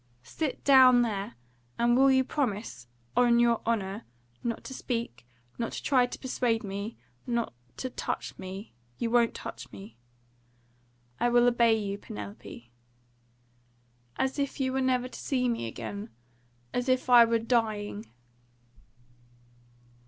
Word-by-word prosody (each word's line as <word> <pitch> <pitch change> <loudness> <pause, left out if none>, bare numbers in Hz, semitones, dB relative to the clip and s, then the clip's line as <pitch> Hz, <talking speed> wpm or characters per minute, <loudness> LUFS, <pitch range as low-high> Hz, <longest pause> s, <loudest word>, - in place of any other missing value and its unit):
"Sit 295 - -4
down 255 -3 +7
there. 210 -1 -3 0.4
And 240 +1 +3
will 270 +2 +6
you 260 0 +4
promise 210 - -3
me 120 - -1
on 240 -1 +4
your 235 -1 +3
honour 210 -1 -1 0.4
not 230 -2 -3
to 265 - -7
speak 230 - -4 0.3
not 230 - -2
to - - -5
try 255 -3 +3
to - - -7
persuade 245 -3 -1
me 200 +2 -5 0.3
not 235 - -1 0.2
to 255 - -4
touch - - -4
me? 190 - -8 0.2
You 230 - -2
won't 235 -1 +3
touch 125 +3 -8
me?" 105 +3 -11 1.2
"I 240 - +2
will 240 0 +5
obey 235 -2 +4
you, 200 -1 -3
Penelope." 105 - -9 1.4
"As 265 +2 -1
if 280 +1 -2
you 260 -1 0
were 265 - 0
never 255 -1 +1
to - - -10
see 255 -3 0
me 230 - -1
again? 200 - -6 0.6
As 245 +1 -1
if 255 0 +2
I 245 -1 +9
were 230 0 +2
dying?" 220 -2 -1
235 Hz, 140 wpm, -29 LUFS, 200-250 Hz, 1.4 s, I